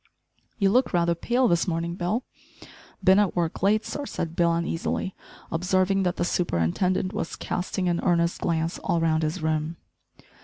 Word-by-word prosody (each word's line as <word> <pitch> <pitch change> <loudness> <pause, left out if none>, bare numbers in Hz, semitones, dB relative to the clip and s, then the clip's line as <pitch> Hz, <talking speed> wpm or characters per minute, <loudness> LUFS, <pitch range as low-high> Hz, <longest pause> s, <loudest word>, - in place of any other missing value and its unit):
"You 195 -2 +3
look 250 +1 +2
rather 170 -1 +3
pale 240 +9 +1
this 170 -2 +2
morning, 170 0 -1
Bill?" 185 +8 -1 0.8
"Bin 190 +1 +6
at 205 -3 +1
work 170 -2 -1
late, 210 +3 +3
sir," 290 -1 -4
said 165 -1 -4
Bill 170 -1 +3
uneasily, 170 +2 -2 0.4
observing 185 +3 +1
that 180 -2 0
the 175 - -1
superintendent 180 - 0
was 205 -6 -3
casting 180 0 -2
an 175 -1 +1
earnest 170 -2 +1
glance 165 0 -1
all 170 -3 0
round 160 -1 +2
his 155 0 -2
room. 155 +1 -1
175 Hz, 160 wpm, -26 LUFS, 165-190 Hz, 0.8 s, Bin